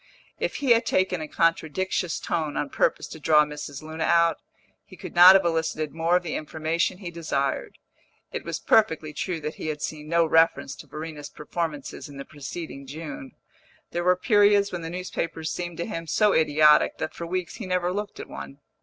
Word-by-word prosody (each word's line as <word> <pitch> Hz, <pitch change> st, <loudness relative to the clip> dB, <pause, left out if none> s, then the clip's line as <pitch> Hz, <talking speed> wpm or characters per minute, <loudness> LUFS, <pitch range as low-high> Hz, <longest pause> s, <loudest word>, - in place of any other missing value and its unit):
If -, -, -2 dB
he 275 Hz, -4 st, +1 dB
had 230 Hz, +1 st, +5 dB
taken 185 Hz, -2 st, +1 dB
a 155 Hz, -, -5 dB
contradictious 165 Hz, +2 st, 0 dB
tone 155 Hz, -3 st, -2 dB
on 145 Hz, -, -2 dB
purpose -, -, +1 dB
to 160 Hz, -, -9 dB
draw 150 Hz, 0 st, +5 dB
Mrs. 150 Hz, -1 st, -7 dB
Luna 160 Hz, +1 st, -3 dB
out, 170 Hz, -1 st, +4 dB, 0.5 s
he -, -, -15 dB
could -, -, -8 dB
not 180 Hz, +2 st, +10 dB
have 195 Hz, -2 st, +4 dB
elicited 160 Hz, -2 st, -1 dB
more 165 Hz, +2 st, +1 dB
of 180 Hz, -, +2 dB
the 165 Hz, -, -4 dB
information 160 Hz, +3 st, -1 dB
he 180 Hz, -3 st, -7 dB
desired. 140 Hz, -5 st, -2 dB, 0.5 s
It -, -, -4 dB
was -, -, -3 dB
perfectly 160 Hz, -8 st, +2 dB
true 175 Hz, 0 st, -3 dB
that 150 Hz, +1 st, -5 dB
he -, -, -3 dB
had 150 Hz, -1 st, -3 dB
seen 150 Hz, -1 st, -5 dB
no 170 Hz, 0 st, +3 dB
reference 160 Hz, -3 st, +3 dB
to 150 Hz, -, -12 dB
Verena's 150 Hz, 0 st, -7 dB
performances 150 Hz, -2 st, -5 dB
in 140 Hz, -, -11 dB
the 140 Hz, -, -7 dB
preceding 145 Hz, -1 st, -8 dB
June; 145 Hz, -2 st, -8 dB, 0.6 s
there 175 Hz, -, -2 dB
were 180 Hz, +1 st, +4 dB
periods 205 Hz, -1 st, +4 dB
when 175 Hz, -, -4 dB
the 165 Hz, -, -5 dB
newspapers 165 Hz, -2 st, -4 dB
seemed 175 Hz, -2 st, -5 dB
to 170 Hz, -, -2 dB
him 165 Hz, -6 st, -5 dB
so 210 Hz, +5 st, +3 dB
idiotic 150 Hz, -1 st, +4 dB
that -, -, -4 dB
for 170 Hz, -, -6 dB
weeks 180 Hz, -1 st, -3 dB
he 215 Hz, -, -6 dB
never 180 Hz, -1 st, 0 dB
looked 205 Hz, +1 st, -5 dB
at -, -, -7 dB
one. 70 Hz, 0 st, -9 dB
165 Hz, 195 wpm, -25 LUFS, 150-180 Hz, 0.6 s, not